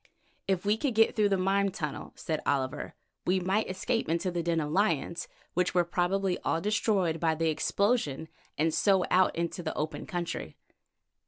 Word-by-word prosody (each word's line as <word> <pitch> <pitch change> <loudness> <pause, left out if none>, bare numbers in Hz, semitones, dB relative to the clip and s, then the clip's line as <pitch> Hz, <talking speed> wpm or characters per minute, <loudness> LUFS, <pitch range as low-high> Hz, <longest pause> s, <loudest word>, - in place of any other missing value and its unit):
"If 190 -1 0
we 210 +2 +3
could 250 0 -1
get 225 +2 +4
through 210 -2 +3
the 195 - +2
mine 195 +2 +2
tunnel," 150 -6 -5
said 155 -2 -3
Oliver, 130 -2 -1 0.3
"we 185 +1 +3
might 190 +4 0
escape 225 +4 -1
into 170 +3 0
the 175 -1 -1
den 165 0 0
of 150 -1 -2
lions, 170 -2 0 0.3
which 180 0 0
were 175 - +5
probably 180 +2 0
all 165 - 0
destroyed 195 -4 +1
by 160 -1 +2
the 165 +1 +1
explosion, 180 - 0 0.3
and 160 +1 +2
so 195 -3 +3
out 185 0 +4
into 170 +1 -2
the 160 -2 -4
open 155 +1 -3
country." 175 -2 -4
180 Hz, 175 wpm, -29 LUFS, 165-195 Hz, 0.3 s, were